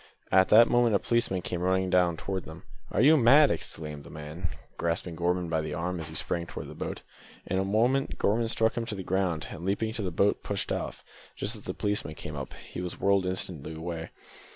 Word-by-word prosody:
At 95 0 +5
that 115 +2 +8
moment 120 -3 +3
a - - +7
policeman 110 -5 0
came 90 - -3
running 95 0 +1
down 90 -2 +3
towards 95 +3 -4
them. 80 +1 -10 0.3
"Are - - +2
you 155 +5 +7
mad?" 140 +4 +7
exclaimed 75 -2 -4
the - - -12
man, 75 +3 -5 0.3
grasping 85 0 -2
Gorman 90 +1 0
by 80 -1 0
the 80 - -4
arm 90 +1 -2
as 80 - -5
he 80 - -9
sprang 85 +1 -1
toward - - -7
the - - -8
boat. - - -5 0.4
In 95 - 0
a - - +2
moment, 120 +7 +1
Gorman 115 +3 +2
struck 110 0 +2
him 115 -1 -2
to 105 - -3
the 95 - -5
ground, 90 -4 -1
and 80 - -8
leaping 100 +4 0
into 110 0 -3
the 95 - -1
boat 100 +4 +2
pushed - - -2
off, - - -4 0.3
just 110 - -2
as 105 - -10
the 90 - -4
policeman 105 -7 -2
came 75 - -7
up. 70 -2 -6
He - - -6
was 90 -1 -5
whirled 100 -1 +3
away - - 0
instantly. 80 -2 -4
90 Hz, 225 wpm, -28 LUFS, 85-105 Hz, 0.4 s, that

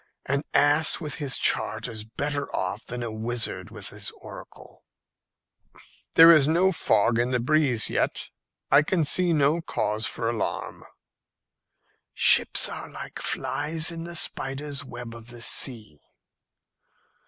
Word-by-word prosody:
An 140 +1 -1
ass 145 +2 +3
with 150 -4 -5
his 140 -2 0
chart - - +1
is 110 -2 -6
better 140 +5 -4
off 95 +5 -3
than 125 0 -4
a 115 - -3
wizard 115 +1 -3
with - - -4
his - - -6
oracle." - - -13 1.3
"There 165 +1 +9
is 150 -4 +5
no 175 +4 +3
fog 115 - +1
in 120 +1 +1
the 125 -1 0
breeze 130 -3 +1
yet, - - -2 0.4
and 150 - +6
I 185 -3 +2
see 175 +4 +2
no 155 +1 +2
cause 110 -8 -2
for 115 - -4
alarm." 115 -2 -4 1.3
"Ships - - +4
are - - -6
like - - -8
flies 155 +3 -1
in 165 -1 -6
the 170 0 -7
spider's 140 -2 -2
web 120 -3 -8
of 115 -1 -12
the 120 -1 -5
sea." 110 - 0
140 Hz, 140 wpm, -25 LUFS, 115-155 Hz, 1.3 s, There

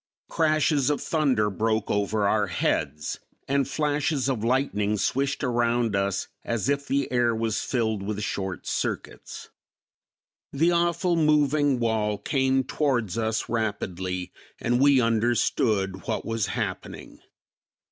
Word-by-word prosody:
Crashes 155 -3 +2
of 145 - +1
thunder 130 -10 +1
broke 110 +2 0
over 105 0 +1
our 105 0 +2
heads 75 -4 -1 0.3
and 140 -1 +1
flashes 145 -1 0
of 125 -6 -1
lightning 115 -4 +1
swished 135 +7 -1
around 120 -3 +1
us 100 0 -1 0.2
as 115 +2 -1
if 140 0 0
the 140 0 0
air 120 -2 +2
was 110 -1 -1
filled 110 -5 -1
with 105 +1 -3
short 95 -3 -4
circuits. - - -4 1.0
The 165 +5 +2
awful 175 +1 +1
moving 150 -3 +3
wall 110 -3 0
came 135 +2 +1
towards 125 - -1
us 110 -1 -1
rapidly 95 -5 -3 0.3
and 120 +1 +1
we 140 -1 +6
understood 110 -4 +1
what - - -2
was 115 -3 -1
happening. - - -5
115 Hz, 125 wpm, -26 LUFS, 105-140 Hz, 1.0 s, we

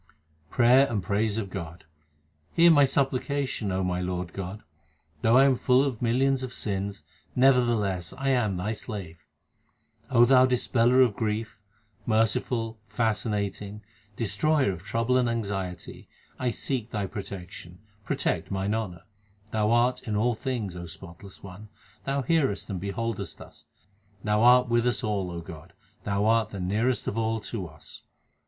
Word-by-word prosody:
Prayer 130 +3 +5
and 105 -5 -2
praise 105 +3 0
of 100 -4 -4
God: 85 +1 -7 0.7
Hear 170 0 +6
my 145 -3 +6
supplication, 135 -4 -1
O 95 +1 0
my 90 0 -1
Lord 90 -1 -3
God, 95 +2 -6 0.6
Though 115 +3 +4
I 135 - +7
am 135 -2 +4
full 125 +2 +3
of 130 -6 -3
millions 130 +3 +2
of 130 -1 -6
sins, 100 -1 -3 0.3
nevertheless 120 -9 +2
I 135 0 -1
am 110 -8 +1
Thy 95 +5 -2
slave. 95 -7 -7 0.9
Thou 125 +1 +6
Dispeller 125 0 +3
of 110 -5 -3
grief, 110 0 -3 0.5
merciful, 115 +1 0
fascinating, 105 -2 -2 0.3
Destroyer 115 +4 +1
of 85 -3 -7
trouble 115 +6 0
and 125 -2 +1
anxiety, 95 -6 -4 0.3
1 125 -2 0
seek 125 -5 -3
Thy 105 -4 -2
protection, 95 -4 -8 0.3
protect - - -1
mine 100 +1 -1
honour; 95 -6 -4 0.5
Thou 105 -1 +1
art 120 +2 +2
in 105 - -1
all 120 +4 +2
things, 110 -5 -4
O 85 0 -7
spotless 85 +3 -12
One, 100 +3 -11 0.4
Thou 135 0 -1
hearest 135 -9 0
and 95 - -3
beholdest 110 +3 -4
us; - - -14 0.6
Thou 105 0 +1
art 125 +1 +6
with 120 +1 +2
us 120 - 0
all, 100 -4 -1
O 85 -1 -5
God; 80 -3 -11 0.3
Thou 100 +1 0
art 110 -1 +3
the 100 - -7
nearest 110 +7 0
of 110 - -1
all 110 0 0
to 105 -4 -5
us. 75 -1 -12
110 Hz, 150 wpm, -27 LUFS, 95-125 Hz, 0.9 s, I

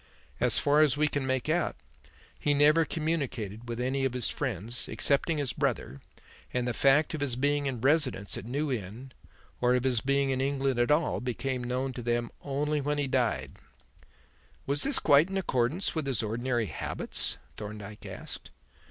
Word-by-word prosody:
As - - +3
far 145 +1 +3
as 150 -2 +4
we 150 0 +3
can 145 -3 -2
make 130 0 0
out, 165 +3 +1 0.6
he 145 -1 +2
never 150 +3 +5
communicated 130 -9 -3
with 120 0 -4
any 130 +2 0
of 135 -2 0
his 125 -3 +1
friends, 120 - -1
excepting 150 +3 +1
his 140 -5 -1
brother, 70 - -2 0.5
and 125 -1 -1
the 125 - 0
fact 140 +7 +4
of 155 - -3
his 135 -4 -1
being 145 +2 +1
in 130 -3 -3
residence 135 -8 +2
at 105 - -6
New 140 +4 -1
Inn 115 +3 -5 0.5
or 125 0 +4
of 125 - +1
his 125 -4 +1
being 140 +1 +1
in 130 0 0
England 135 -2 0
at 120 - +2
all 150 +2 +2
became 125 +1 -2
known 130 +2 -2
to 120 - -6
them 120 0 -1
only 145 +2 -1
when 145 +1 -1
he 145 - +1
died." 115 - 0 1.1
"Was 140 +1 +1
this 280 -1 +3
quite 145 +5 +5
in 195 - -2
accordance 145 +1 0
with 155 -4 -2
his 125 -5 0
ordinary 120 +2 -1
habits?" - - -3 0.2
Thorndyke 105 0 -8
asked. - - -7
135 Hz, 180 wpm, -29 LUFS, 120-145 Hz, 1.1 s, never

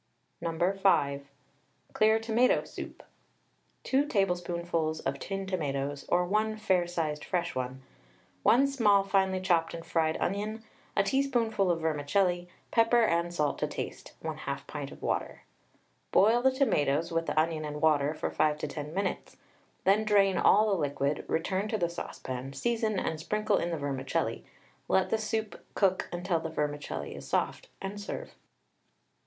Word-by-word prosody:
No. 170 +3 0
5. 140 -7 +2 0.7
CLEAR 220 +1 +4
TOMATO 230 +3 +3
SOUP. - - -9 0.8
2 270 +2 +2
tablespoonfuls 175 - 0
of 135 +1 -2
tinned 195 +3 -4
tomatoes, 145 -5 -2
or 180 0 +3
1 215 +3 0
fair 185 -5 +2
sized 155 -4 -2
fresh 175 -2 -1
one, 130 +1 -4 0.6
1 255 +4 +5
small 220 -8 +4
finely 190 -1 +1
chopped 170 -3 +1
and 165 - -8
fried 160 -1 +1
onion, 210 +3 -2 0.3
a 200 - +5
teaspoonful 230 -4 +1
of 165 -2 +1
vermicelli, 175 +4 +1 0.2
pepper 230 +1 +4
and 170 -3 +1
salt 150 -4 0
to - - 0
taste, - - -6
1/2 - - -4
pint - - -6
of - - -12
water. - - -2 0.7
Boil 225 +4 +5
the 265 - +5
tomatoes 165 - +1
with 165 0 -1
the - - +1
onion 160 0 0
and 150 0 -5
water 150 -1 +3
for - - -3
5 150 -1 +2
to 150 - -3
10 150 +2 -6
minutes, 195 0 -3 0.5
then 200 +3 +4
drain 200 -3 +4
all 210 +4 +5
the 190 -4 +1
liquid; 145 0 -1
return 190 +5 0
to 220 - -1
the 170 -4 0
saucepan, 130 -5 -6
season 220 - 0
and 160 -3 -2
sprinkle 215 +6 0
in 170 - -1
the 165 - -2
vermicelli, 135 -2 -2 0.4
let 190 0 +2
the 225 - +2
soup 220 0 -3
cook 190 -2 +2
until 175 -1 -1
the 160 0 -4
vermicelli 145 - -3
is - - -9
soft, - - -1
and 200 +1 -5
serve. - - -6
175 Hz, 155 wpm, -30 LUFS, 155-210 Hz, 0.8 s, 1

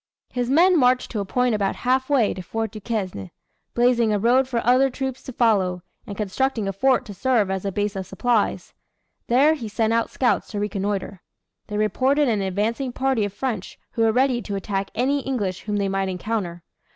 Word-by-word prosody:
His 245 -1 -2
men 345 +5 +5
marched 250 -1 +2
to 220 - -2
a 200 - -2
point 250 +4 +1
about 200 -2 0
half 260 +2 0
way 255 -7 +3
to 185 - -7
Fort 225 +4 -3
Duquesne, 195 - -4 0.5
blazing 240 -2 +3
a 210 - +2
road 245 +5 +3
for 245 -3 -1
other 255 +3 +4
troops 265 0 -4
to 260 - -8
follow, 195 -7 +1 0.2
and 200 - -7
constructing 220 +2 -1
a 195 - -2
fort 255 +5 +2
to 210 - -8
serve 220 -2 +1
as 190 0 -3
a 195 - -1
base 205 +1 -2
of 190 -1 -4
supplies. 240 -4 0 0.5
There 275 +6 +5
he 255 -8 -5
sent 220 +1 0
out 230 0 +1
scouts 250 - 0
to 205 - -4
reconnoitre. 200 -2 -3 0.5
They 210 - -4
reported 265 +7 +2
an 215 -4 +1
advancing 215 +7 -1
party 260 -4 0
of 205 - -4
French 225 -6 -4
who 230 - -2
were 225 0 +4
ready 250 +1 +2
to 205 - -5
attack 195 0 -3
any 265 +5 +1
English 205 -9 -3
whom 210 -1 -2
they 200 -1 0
might 195 0 -1
encounter. 180 -2 -3
225 Hz, 200 wpm, -23 LUFS, 200-255 Hz, 0.5 s, men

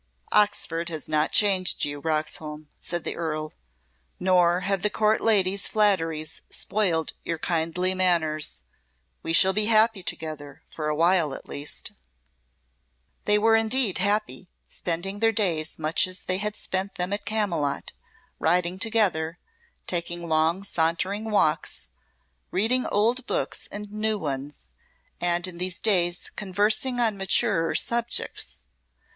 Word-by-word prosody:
"Oxford 170 -5 +1
has 160 -3 -6
not 155 0 +1
changed 190 -3 +3
you, 145 0 -4
Roxholm," 155 -1 -3
said 175 -1 -2
the - - -3
Earl. 155 -2 -3 0.7
"Nor 180 -1 +3
have 195 -1 -1
the 210 - +1
Court 215 +1 +2
ladies' 200 -3 +3
flatteries 165 -7 +1
spoiled 175 -7 0
your 165 - -2
kindly 170 +3 0
manners. 160 - +1 0.6
We - - -3
shall 190 +4 +5
be 210 +2 +2
happy 220 -2 +4
together, 155 -5 -6
for 155 -1 -4
awhile 165 -1 +2
at - - -11
least." 145 +1 -4 1.3
They 210 0 +4
were 225 +1 +4
indeed 225 -2 +2
happy, 205 -1 -1 0.2
spending 185 +4 -3
their 225 +1 +3
days 175 -8 0
much 160 +3 +1
as 185 0 -6
they 185 - -1
had 210 +1 -2
spent 190 +1 -2
them 180 +2 -2
at 205 - -3
Camylott 200 -9 -1 0.5
riding 175 +2 +1
together, 190 -7 +1 0.5
taking 175 -1 -3
long 160 +4 +2
sauntering 185 +4 -1
walks, 155 - +1 0.6
reading 245 +6 +1
old 235 +5 +1
books - - -2
and 205 0 -8
new 215 0 0
ones, 140 - -5 0.5
and 175 0 +1
in 175 -2 -9
these 180 -1 -2
days 175 -5 +1
conversing 210 +6 +1
on 225 -4 +2
maturer 190 -3 +1
subjects. 235 0 -1
185 Hz, 130 wpm, -25 LUFS, 160-210 Hz, 1.3 s, shall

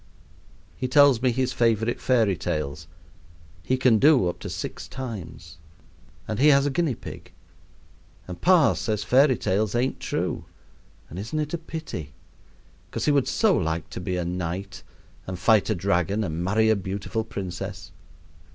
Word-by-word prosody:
He 130 - -3
tells 140 -2 +5
me 130 - +3
his 130 +1 -1
favorite 115 0 +1
fairy 115 -7 +2
tales, 75 -1 -4 0.7
he 130 +9 0
can 125 -4 +4
do 140 - +5
up 85 - -6
to - - -6
six - - -6
times, 85 -10 -8 0.7
and 110 - -3
he 145 - +5
has 140 -1 +5
a 145 - 0
guinea 160 -4 0
pig, - - -10 1.0
and 90 -1 -8
pa 175 -5 +5
says 105 -3 -2
fairy 130 +2 +4
tales 100 +3 0
ain't 125 +3 0
true; - - -3 0.6
and 85 - -8
isn't 110 +10 -4
it 150 0 -2
a - - 0
pity? 155 - -7 0.8
'cos - - -3
he 150 - +3
would 140 -3 +2
so - - +3
like 80 0 -2
to - - -5
be 90 0 -2
a 90 - -2
knight 90 +2 -4 0.5
and 95 -1 -4
fight 105 +3 +3
a 110 - +1
dragon 95 +3 0
and 85 -2 -3
marry 110 +4 +3
a - - +4
beautiful 100 +3 -3
princess. 95 -6 -6
110 Hz, 160 wpm, -25 LUFS, 90-130 Hz, 1.0 s, tells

